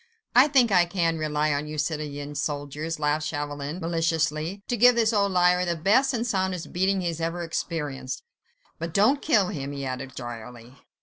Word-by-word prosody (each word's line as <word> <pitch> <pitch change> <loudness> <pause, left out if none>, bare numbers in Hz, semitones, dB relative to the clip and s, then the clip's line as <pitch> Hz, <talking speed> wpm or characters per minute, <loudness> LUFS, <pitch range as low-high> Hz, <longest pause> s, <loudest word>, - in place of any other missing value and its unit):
"I 255 +4 +8
think 260 -6 +4
I 180 -2 +5
can 170 -2 0
rely 150 -1 0
on 145 +1 -2
you, 155 0 -6
citoyen 150 -1 -3
soldiers," 145 +2 -3
laughed 150 +1 0
Chauvelin, 145 +1 -4
maliciously, 165 +2 -1
"to 245 - 0
give 245 +2 +6
this 230 -1 +2
old 200 -2 +2
liar 180 0 +3
the 170 -1 -1
best 220 - +3
and 235 -2 -1
soundest 190 -6 -2
beating 190 +2 +1
he 175 - -2
has 165 0 -5
ever 165 +1 -2
experienced. 150 -6 -4 0.6
But 165 0 -5
don't 230 +8 +4
kill 210 - +3
him," 140 -2 -4
he 140 -1 -5
added 130 +1 -5
drily. 120 +1 -9
165 Hz, 180 wpm, -26 LUFS, 145-190 Hz, 0.6 s, I